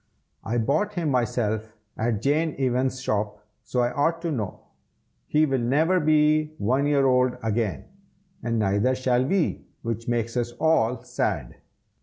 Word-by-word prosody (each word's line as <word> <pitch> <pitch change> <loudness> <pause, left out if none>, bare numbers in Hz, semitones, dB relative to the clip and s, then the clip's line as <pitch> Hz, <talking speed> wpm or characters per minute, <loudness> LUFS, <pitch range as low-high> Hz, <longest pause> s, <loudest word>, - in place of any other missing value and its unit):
I 115 +3 -2
bought 155 - 0
him 170 -4 0
myself 110 -3 -1 0.2
at 110 -1 -1
Jane 155 +3 +1
Evans's 130 0 0
shop, 105 -1 -2 0.2
so 125 - -1
I 120 0 +1
ought 165 +5 +1
to 170 - -1
know. 110 -9 -4 0.7
He 155 +1 +3
will 135 -3 0
never 155 +10 +2
be 155 0 +3
one 130 +6 +1
year 140 -2 +3
old 125 -1 +3
again, 110 -2 -1 0.6
and 115 -1 -1
neither 105 +5 +2
shall 130 -1 +1
we, 175 +6 0 0.2
which 115 -1 -4
makes 115 -1 -1
us 120 -1 -1
all 125 -5 +1
sad." - - -2
125 Hz, 150 wpm, -25 LUFS, 115-150 Hz, 0.7 s, He